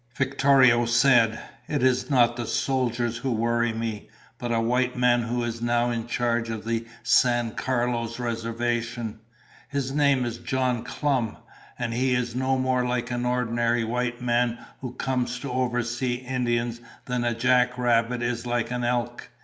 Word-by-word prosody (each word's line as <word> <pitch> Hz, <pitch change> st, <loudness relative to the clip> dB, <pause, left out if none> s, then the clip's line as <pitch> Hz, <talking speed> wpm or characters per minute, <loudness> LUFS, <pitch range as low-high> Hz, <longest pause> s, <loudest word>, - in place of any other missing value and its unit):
Victorio 135 Hz, -3 st, +4 dB
said, 115 Hz, -1 st, +4 dB, 0.3 s
"It 145 Hz, -4 st, -1 dB
is 130 Hz, 0 st, +2 dB
not 120 Hz, -4 st, +4 dB
the 120 Hz, -2 st, -4 dB
soldiers 120 Hz, -3 st, 0 dB
who 130 Hz, +2 st, -2 dB
worry 115 Hz, +1 st, +1 dB
me, 110 Hz, -2 st, -4 dB, 0.3 s
but 120 Hz, -1 st, -3 dB
a 115 Hz, -, +2 dB
white 125 Hz, +2 st, +1 dB
man 125 Hz, -1 st, +3 dB
who 120 Hz, +1 st, -2 dB
is 115 Hz, 0 st, -4 dB
now 120 Hz, 0 st, +1 dB
in 115 Hz, -1 st, -3 dB
charge 120 Hz, -1 st, 0 dB
of 110 Hz, -1 st, -5 dB
the 115 Hz, 0 st, -2 dB, 0.2 s
San 120 Hz, -2 st, +3 dB
Carlos 120 Hz, -1 st, -1 dB
Reservation. 115 Hz, -1 st, -3 dB, 0.5 s
His 140 Hz, -2 st, -2 dB
name 140 Hz, -3 st, +2 dB
is 120 Hz, -1 st, -4 dB
John 130 Hz, -3 st, -1 dB
Clum, 130 Hz, -5 st, -1 dB, 0.4 s
and 120 Hz, -2 st, -2 dB
he 125 Hz, +1 st, +1 dB
is 120 Hz, -1 st, -1 dB
no 130 Hz, +1 st, +1 dB
more 130 Hz, -1 st, +1 dB
like 125 Hz, -1 st, -1 dB
the 120 Hz, 0 st, -2 dB
ordinary 120 Hz, -1 st, +1 dB
white 120 Hz, +1 st, -2 dB
man 120 Hz, -1 st, +1 dB, 0.2 s
who 125 Hz, -2 st, -6 dB
comes 125 Hz, -1 st, -1 dB
to 140 Hz, -, -5 dB
oversee 120 Hz, 0 st, -1 dB
Indians 120 Hz, -2 st, -2 dB, 0.2 s
than 125 Hz, -1 st, -1 dB
a 120 Hz, -1 st, 0 dB
jack 125 Hz, +1 st, +2 dB
rabbit 120 Hz, 0 st, +1 dB
is 120 Hz, 0 st, -2 dB
like 120 Hz, 0 st, -1 dB
an 125 Hz, 0 st, -2 dB
elk. 120 Hz, 0 st, -2 dB
120 Hz, 160 wpm, -25 LUFS, 115-125 Hz, 0.5 s, Victorio